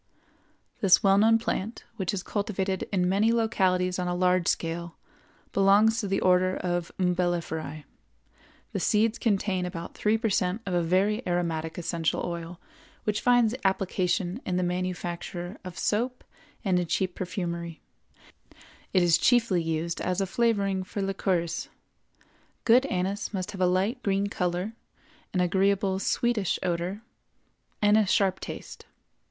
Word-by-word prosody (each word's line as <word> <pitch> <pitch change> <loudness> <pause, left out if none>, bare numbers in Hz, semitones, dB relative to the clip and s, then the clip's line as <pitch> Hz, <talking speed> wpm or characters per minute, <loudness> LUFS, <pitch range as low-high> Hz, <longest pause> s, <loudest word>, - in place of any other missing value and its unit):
This 195 -3 +5
well 195 0 +5
known 225 +2 +5
plant, 225 -1 -3
which 190 -4 -1
is 190 -3 -3
cultivated 195 -2 -2
in 180 -3 +1
many 205 +5 +3
localities 185 -5 +1
on 180 - -1
a 175 - -1
large 180 -1 +2
scale, 170 0 -2 0.6
belongs 205 +3 +4
to 205 - -2
the 195 0 0
Order 185 0 +3
of 175 -1 -2
Umbelliferæ. 175 -4 -1 0.9
The - - -2
seeds 220 +3 +2
contain 195 -4 0
about 170 -2 -6
three 215 +1 +1
per 225 -1 -1
cent 185 +4 0
of 185 - -3
a 175 - +2
very 190 +6 +2
aromatic 165 -2 -1
essential 165 -1 -1
oil 170 0 -6 0.4
which 210 0 -1
finds 245 -2 +4
application 190 +1 0
in 180 - -1
the 180 - +1
manufacture 180 +1 -4
of 180 -2 -8
soap 245 +4 -1 0.4
and 185 -2 +3
in 175 - -2
cheap 185 +2 0
perfumery; 170 -3 -4 1.1
it 185 -2 +4
is 170 -1 +4
chiefly 230 -7 +3
used 165 +1 -2
as 185 +1 -1
a 195 - +1
flavoring 200 -3 +1
for 200 +1 -4
liqueurs. 185 -3 -1 1.0
Good 250 +4 +5
anise 195 +3 -2
must 185 -1 -3
have 195 - -7
a 180 - +4
light 195 +8 0
green 200 -1 0
color, 180 +2 -2 0.6
an 185 - +1
agreeable 190 +1 +2
sweetish 215 -1 0
odor, 180 +4 -2 0.8
and 210 +1 +5
a 210 - +2
sharp 190 -1 +2
taste. - - -8
185 Hz, 145 wpm, -27 LUFS, 175-205 Hz, 1.1 s, This